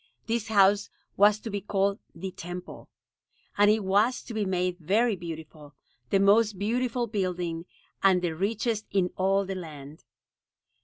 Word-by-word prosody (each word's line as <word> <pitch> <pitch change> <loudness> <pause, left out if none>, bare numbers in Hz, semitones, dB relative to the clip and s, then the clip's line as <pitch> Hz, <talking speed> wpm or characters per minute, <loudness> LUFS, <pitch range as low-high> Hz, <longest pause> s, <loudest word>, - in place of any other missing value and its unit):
This 230 -1 -1
house 200 -1 +4 0.3
was 205 +1 +5
to 225 - -6
be 200 0 -3
called 200 +1 0 0.2
"The 185 +3 -5
Temple"; 180 +1 -8 0.7
and 205 0 +5
it 215 0 +2
was 205 +6 +2
to 235 - -8
be 215 -2 -1
made 180 -1 -1
very 210 +7 +2
beautiful, 160 -4 -9 0.3
the 195 - +3
most 205 +1 +4
beautiful 240 +4 0
building, 180 -6 -3 0.4
and 185 -2 +4
the 165 -2 -1
richest 215 +4 -1
in 185 -2 +1
all 195 +1 +2
the 195 - -4
land. 155 -5 -9
195 Hz, 150 wpm, -27 LUFS, 180-210 Hz, 0.7 s, was